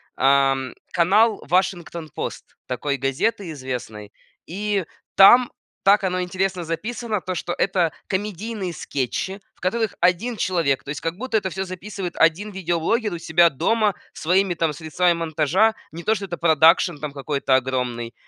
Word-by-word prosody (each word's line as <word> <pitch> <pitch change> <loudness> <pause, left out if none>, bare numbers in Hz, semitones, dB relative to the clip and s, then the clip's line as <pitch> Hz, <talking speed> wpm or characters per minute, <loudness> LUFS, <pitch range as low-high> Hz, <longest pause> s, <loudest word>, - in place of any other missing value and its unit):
ам, 135 -1 +2 0.2
канал 205 +6 +3
"Вашингтон 175 -2 -1
пост" - - -7
такой 140 +3 -2
газеты 155 - -1
известной, 125 -7 -6 0.4
и 200 0 -2 0.3
там, 240 +6 +7 0.3
так 200 +1 +5
оно 185 -1 0
интересно 185 0 -2
записано, 215 +5 -3
то 185 - -4
что 175 - -3
это 175 -3 +1 0.2
комедийные 205 -1 -3
скетчи, 160 +9 -3 0.2
в - - -32
которых 220 +4 -1
1 185 +7 +2
человек, 165 -7 0
то - - -11
есть 150 - -5
как 165 +1 -2
будто 235 0 -1
это 190 -2 -2
всё 190 +3 -3
записывает 185 -1 -6
1 175 +6 +2
видеоблогер 190 +4 -1
у - - -3
себя 170 +1 +4
дома 210 - +1 0.2
своими, 185 +3 +1
там, 160 -2 0
средствами 165 +3 +1
монтажа, 165 +6 +1 0.2
не 170 +2 -8
то 220 - +2
что 200 -1 -4
это 175 -2 -6
продакшн 160 -2 +4
там 150 -1 -5
какой-то 140 -1 0
огромный. 125 -3 -2
175 Hz, 150 wpm, -22 LUFS, 150-195 Hz, 0.4 s, там